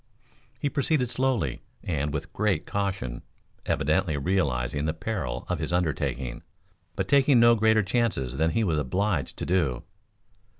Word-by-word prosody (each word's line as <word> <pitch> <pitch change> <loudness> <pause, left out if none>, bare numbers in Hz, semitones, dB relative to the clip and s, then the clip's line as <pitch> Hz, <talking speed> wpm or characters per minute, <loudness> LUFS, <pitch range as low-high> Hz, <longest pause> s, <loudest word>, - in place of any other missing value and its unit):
He - - 0
proceeded 140 -3 +1
slowly 125 - 0 0.2
and 75 -4 -1
with 75 -1 -5
great 95 -5 0
caution, 95 -12 -3 0.5
evidently 80 +2 +1
realizing 70 -4 0
the 80 0 -1
peril 90 - -3
of - - -2
his - - -3
undertaking, 70 -8 -1 0.5
but - - -2
taking 140 -2 +5
no 120 0 +7
greater 110 -1 +3
chances 95 - -1
than 80 +2 +2
he 110 +8 +1
was 80 -7 +1
obliged 85 0 -1
to - - -3
do. 80 -9 0
90 Hz, 140 wpm, -27 LUFS, 70-110 Hz, 0.5 s, no